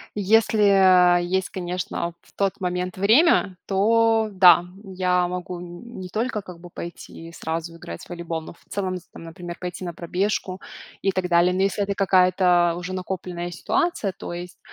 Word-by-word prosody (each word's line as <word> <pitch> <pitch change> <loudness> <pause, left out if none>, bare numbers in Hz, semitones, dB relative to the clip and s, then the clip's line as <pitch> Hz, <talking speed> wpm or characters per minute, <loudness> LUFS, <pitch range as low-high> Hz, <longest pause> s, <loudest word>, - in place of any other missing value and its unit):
Если, 215 +1 +3
а, 180 -2 +6
есть, 185 +2 -1
конечно, 175 -2 -4
в - - -25
тот 195 -1 -1
момент 180 0 -3
время, 215 - +4
то 225 +3 +3
да, 175 -2 +7 0.2
я 180 -2 0
могу, 180 0 -5
н 180 +7 -10
не 180 - -7
только, 220 +2 -2
как 180 -3 -11
бы, 175 +1 -12
пойти 170 -1 -9
и - - -13
сразу 165 0 -5
играть 85 - -9
в - - -15
волейбол, 170 -2 -4
но - - -10
в 170 - -19
целом, 185 -2 -2
з 180 - -12
там, - - -10
например, 175 +1 -8
пойти 180 0 -6
на 175 - -5
пробежку 185 +2 -2 0.4
и 195 - +1
так 185 -1 -2
далее. 175 +1 +4
Но 185 - 0
если 195 +1 +1
это 200 0 -2
какая-то 180 -2 +3
уже 180 +1 -6
накопленная 180 -1 -5
ситуация, 340 - -1
то 175 - -8
есть, 175 +1 -8
180 Hz, 180 wpm, -23 LUFS, 175-195 Hz, 0.4 s, да